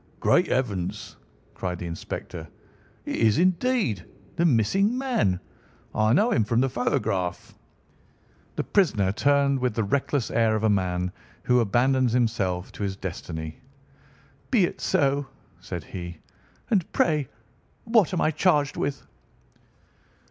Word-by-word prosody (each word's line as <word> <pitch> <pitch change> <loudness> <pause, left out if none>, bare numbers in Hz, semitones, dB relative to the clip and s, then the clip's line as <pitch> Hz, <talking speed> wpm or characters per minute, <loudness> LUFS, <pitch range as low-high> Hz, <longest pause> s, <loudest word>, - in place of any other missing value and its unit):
"Great - - +3
heavens!" 100 -9 -2 0.4
cried 90 -1 -4
the 90 - -6
inspector, 85 0 -6 0.6
"it - - -3
is, 110 -2 +3
indeed, 185 - +1 0.3
the 170 - +1
missing 175 - +2
man. 240 - +1 0.5
I 110 0 +2
know 210 - +3
him 115 - +3
from 115 +3 +1
the 135 +1 +2
photograph." 95 -7 -1 1.0
The - - -1
prisoner 110 - +2
turned 140 +4 +2
with 125 -3 -1
the 115 - +1
reckless 135 +4 0
air 115 -1 +2
of 110 - -2
a 110 - +4
man 90 -2 0 0.3
who 125 0 +3
abandons 120 +3 +2
himself 105 -7 0
to - - -10
his 95 -1 -2
destiny. 80 -4 -6 0.9
"Be 230 -7 +4
it - - -6
so," 140 0 +1 0.3
said 90 -2 -6
he. 85 -1 -7 0.5
"And 190 -7 +1
pray 150 -5 +2 0.6
what 225 -6 +3
am 180 - -1
I 155 - +3
charged 150 -3 +2
with?" 140 - -3
120 Hz, 135 wpm, -25 LUFS, 95-145 Hz, 1.0 s, a